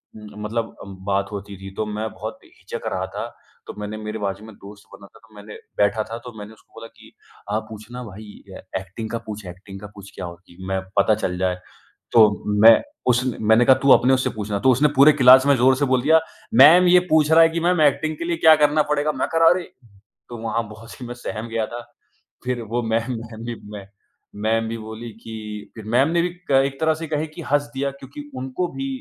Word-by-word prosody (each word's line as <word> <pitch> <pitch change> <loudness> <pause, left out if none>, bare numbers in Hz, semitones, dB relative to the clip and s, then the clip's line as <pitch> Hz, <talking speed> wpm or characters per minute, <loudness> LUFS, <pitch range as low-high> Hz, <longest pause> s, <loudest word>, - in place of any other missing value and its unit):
उम, 105 -1 -11 0.2
मतलब 115 +1 -3
अम, 100 -1 -10
बात 100 0 -1
होती 100 -1 -7
थी 95 0 -8
तो 110 - -2
मैं 105 +1 -4
बहुत - - -8
हिचक - - -10
रहा - - -2
था। - - -4 0.4
तो - - -7
मैंने 105 +1 -5
मेरे 110 0 -6
बाजू 100 +1 -4
में 110 - -12
दोस्त 100 +1 -14
बना 100 - -13
था - - -21
तो 110 - -22
मैंने 105 +1 -11 0.2
बैठा 105 +1 +2
था 115 +2 -7
तो 125 - -7
मैंने 105 +1 -9
उसको 110 - -25
बोला 115 - -9
कि, - - -19 0.4
"आप 110 +1 -1
पूछना 110 +3 -9
भाई 110 -1 -10 0.3
ऐ - - -12 0.2
ऐक्टिंग 95 +4 -8
का 115 - -3
पूछ 105 -1 -7
ऐक्टिंग 95 +2 -10
का 105 - -9
पूछ 100 -1 -12
क्या 95 - -6
होती 85 +1 -12
है। 95 - -8
मैं 95 0 -1 0.2
पता 100 +2 +4
चल 90 -4 -3
जाए।" 90 0 -1 0.5
तो 105 -3 +4 0.2
मैं 115 - +10 0.4
उसने 125 0 -1
मैंने 110 +2 +5
कहा, 130 - +7
"तू 135 +1 +2
अपने 130 +2 +5
उससे 130 0 +1
पूछना।" 105 -2 -4
तो 130 +6 +4
उसने 135 +5 +3
पूरे 140 +3 +7
क्लास 130 -1 +7
में 140 - +5
ज़ोर 130 +2 +4
से 145 - +1
बोल 130 -2 +1
दिया, 160 +3 +5 0.3
"मैम 160 +9 +8
ये 180 +1 +7
पूछ 155 -1 +3
रहा 165 +1 +7
है 165 - +5
कि 165 +1 -3
मैम 175 0 +1
ऐक्टिंग 155 +2 +2
के 170 - -5
लिए 170 -1 -1
क्या 160 -1 +7
करना 150 +1 +4
पड़ेगा?" 150 +1 +1
मैं - - -2
कहा 165 0 +5
अरे! 175 +1 +1 0.7
तो 120 - -7
वहाँ 115 0 -2
बहुत 110 +2 -12
से 125 - -10
मैं 120 - -6
सहम 115 -2 -6
गया 115 -1 -1
था। 120 0 -7 0.6
फिर 125 -1 -2
वो 120 +2 -1
मैम 115 +2 -1
मैम 115 0 -10
भी 120 0 -4 0.2
मै 100 - -10 0.6
मैम 115 +1 +1
भी 115 - -4
बोली 110 +1 -8
कि 115 - -8 0.4
फिर 110 -2 -10
मैम 125 +6 +2
ने 170 +1 +2
भी 180 - 0 0.2
क 135 0 +5
एक 135 0 -5
तरह 160 0 +3
से - - -5
कहें 155 0 -2
कि 160 - -9
हँस 145 0 +1
दिया 140 +1 -1
क्योंकि 140 +2 -11
उनको 130 +7 -3
भी 270 - -4
115 Hz, 235 wpm, -22 LUFS, 105-140 Hz, 0.7 s, मैं